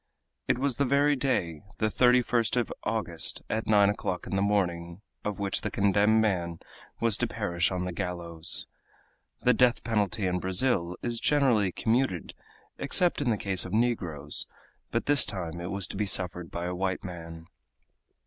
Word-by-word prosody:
It - - +2
was 135 -1 0
the 140 - +2
very 140 +2 +3
day 90 - -1 0.2
the - - 0
31st 125 -1 +3
of 120 - 0
August, 90 -8 -2
at 110 - -2
nine 105 -2 +5
o'clock 95 -3 -2
in - - -3
the 95 - +1
morning 90 -3 -1 0.2
of 105 -1 -3
which 100 -1 -1
the - - -2
condemned 100 +2 +3
man 90 -6 0 0.4
was 115 -3 +3
to 120 - 0
perish 100 -7 0
on 90 -1 -2
the 90 - -3
gallows. 85 -3 -2 0.8
The 125 - +5
death 125 +1 +3
penalty 105 -3 0
in 90 0 0
Brazil 90 -2 0
is 120 -1 -1
generally 125 -10 +3
commuted 110 -4 0 0.5
except 175 +3 +2
in 135 - +1
the 110 - +1
case 95 -3 +1
of - - -7
negroes, 90 -11 -1 0.4
but - - -1
this 145 -2 +6
time 85 -3 -3
it 85 - -5
was 100 0 0
to - - -8
be 105 +1 -1
suffered 90 -2 0
by 85 +1 -4
a 90 - -2
white 95 +1 -2
man. 85 -2 -8
100 Hz, 170 wpm, -28 LUFS, 90-115 Hz, 0.8 s, this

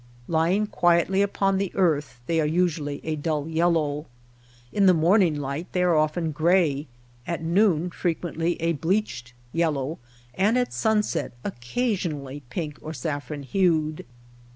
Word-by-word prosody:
Lying 170 +6 +2
quietly 175 0 +2
upon 195 -1 +1
the 195 -2 -1
earth 150 -9 +1
they 165 +2 +1
are 150 - +1
usually 160 -3 0
a 155 -1 -2
dull 150 0 -2
yellow. 160 -2 +1 0.7
In 200 -2 +4
the 185 - +6
morning 170 0 +4
light 140 +5 -4
they 180 - +2
are 175 -2 +3
often 155 +2 +1
gray, 155 -2 +2 0.4
at 170 -1 -3
noon 175 -1 +2
frequently 170 0 -2
a 165 +1 +1
bleached 155 - -2 0.2
yellow, 155 -3 0 0.3
and 210 +6 +2
at 250 -1 0
sun 220 -1 +2
set - - -3
occasionally 145 - -3
pink 150 +2 -4
or 155 - -6
saff 145 0 -4
ron 145 -2 -5
hued. 155 0 +1
165 Hz, 145 wpm, -25 LUFS, 150-180 Hz, 0.7 s, the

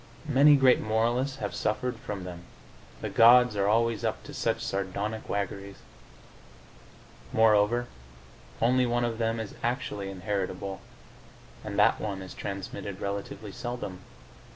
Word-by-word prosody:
Many 145 +1 +6
great 135 -2 +5
moralists 120 +5 0
have 105 -5 -4
suffered 120 +3 -1
from 105 -7 -6
them: 90 -1 -7 0.6
the - - -3
gods 125 0 +7
are 100 -1 +1
always 115 +1 +2
up - - -2
to - - -10
such - - 0
sardonic 100 +3 -3
waggeries. 100 0 -3 1.5
Moreover, 110 +2 +4 0.8
only 125 +1 +3
one 120 0 +1
of 115 -1 -3
them 115 0 0
is 110 -2 -5
actually 120 -5 -2
inheritable, 95 0 -3 0.8
and 100 -2 -5
that 105 - +4
one 100 -3 -4
is 95 - -9
transmitted 100 0 -6
relatively 100 +1 -5
seldom. 120 -5 -5
110 Hz, 130 wpm, -28 LUFS, 100-120 Hz, 1.5 s, gods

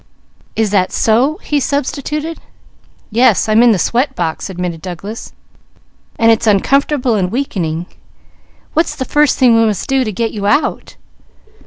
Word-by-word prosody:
"Is 220 -2 0
that 185 -3 +1
so?" 250 +8 +2
he 295 - 0
substituted. 295 +3 -3 0.7
"Yes, 230 -1 +3
I'm 215 +1 +4
in 240 -1 +6
the 210 - +2
sweat 245 - 0
box," 165 +2 -3
admitted 175 -3 -4
Douglas. 190 +5 -7 0.9
"And 230 -1 +4
it's 225 0 +1
uncomfortable 255 +5 +2
and 185 -4 0
weakening. 175 - -2 0.9
What's 325 +2 0
the 260 - -4
first 295 0 +2
thing 250 -3 +5
we 225 - +4
must 210 -4 -2
do 270 -1 +2
to 215 - -3
get 225 +3 -2
you 205 -1 -3
out?" 290 +8 0
225 Hz, 150 wpm, -15 LUFS, 195-275 Hz, 0.9 s, in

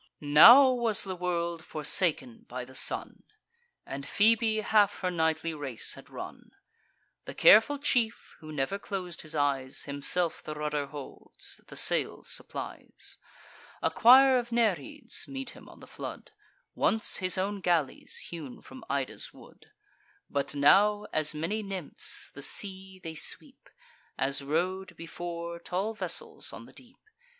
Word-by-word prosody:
Now 235 - +9
was 235 -4 +2
the 190 -1 -5
world 170 -2 -2
forsaken 150 -5 -1
by 125 0 -5
the 130 - -14
sun, 130 - -2 0.6
And 140 0 -6
Phoebe 220 +6 +2
half 205 -1 +2
her 180 -1 -1
nightly 160 -1 0
race 140 -7 -1
had - - -13
run. - - -9 0.8
The - - -8
careful 225 +7 +6
chief, 245 -5 -1
who 155 -1 -10
never 150 +7 -2
clos'd 185 -4 -5
his 155 0 -6
eyes, 140 -3 0
Himself 150 +4 0
the 155 - -7
rudder 150 -1 -2
holds, 145 -1 -9
the - - -9
sails - - +1
supplies. - - -4 0.6
A - - +2
choir 260 +2 +7
of 240 0 -7
Nereids 235 - -1
meet 270 -2 -4
him - - -14
on - - -16
the - - -11
flood, - - -8 0.4
Once 220 -1 +1
his 185 0 0
own 200 +2 -2
galleys, 165 -7 -1
hewn 155 -7 -8
from 130 - -12
Ida's 140 -2 -3
wood; - - -17 0.6
But 140 0 -1
now, 205 +9 +4
as 155 0 +1
many 170 +8 -2
nymphs, 195 -6 -3
the - - -10
sea 190 -2 -2
they 165 -3 -8
sweep, 155 - -6 0.5
As 135 +1 -1
rode, 180 +7 -2
before, 170 0 -6
tall 190 +6 -3
vessels 215 - -1
on - - -9
the - - -17
deep. - - -15
175 Hz, 140 wpm, -29 LUFS, 150-210 Hz, 0.8 s, Now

